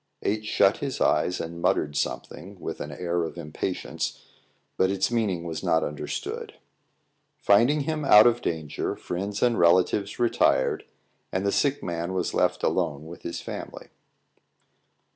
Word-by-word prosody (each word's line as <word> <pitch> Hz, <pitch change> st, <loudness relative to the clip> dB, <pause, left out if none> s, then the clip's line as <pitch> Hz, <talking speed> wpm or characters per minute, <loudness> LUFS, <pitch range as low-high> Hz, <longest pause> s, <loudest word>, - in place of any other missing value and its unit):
H 105 Hz, +1 st, -1 dB
shut -, -, +3 dB
his -, -, -4 dB
eyes 90 Hz, -, +2 dB
and 85 Hz, +1 st, -6 dB
muttered 75 Hz, -3 st, +1 dB
something, 90 Hz, +5 st, -4 dB
with -, -, -5 dB
an -, -, -5 dB
air 85 Hz, -1 st, -1 dB
of 80 Hz, -, -5 dB
impatience; 75 Hz, +4 st, -4 dB, 0.5 s
but 95 Hz, -, +2 dB
its 95 Hz, +3 st, 0 dB
meaning 105 Hz, -8 st, 0 dB
was 80 Hz, -2 st, -5 dB
not 80 Hz, -, +2 dB
understood. 75 Hz, -, -5 dB, 0.8 s
Finding 120 Hz, +9 st, +4 dB
him 155 Hz, +1 st, -2 dB
out 105 Hz, -6 st, +8 dB
of 120 Hz, 0 st, +3 dB
danger, 80 Hz, -3 st, -3 dB
friends 100 Hz, +3 st, -4 dB
and 120 Hz, -2 st, +3 dB
relatives 90 Hz, +4 st, +3 dB
retired, 120 Hz, -1 st, +2 dB, 0.5 s
and 95 Hz, +2 st, -1 dB
the 100 Hz, -, +2 dB
sick 140 Hz, +4 st, +1 dB
man 85 Hz, +1 st, -3 dB
was 90 Hz, -2 st, -1 dB
left -, -, +1 dB
alone 75 Hz, +2 st, 0 dB
with 85 Hz, +2 st, -10 dB
his 85 Hz, -, -5 dB
family. -, -, -8 dB
95 Hz, 145 wpm, -26 LUFS, 85-105 Hz, 0.8 s, out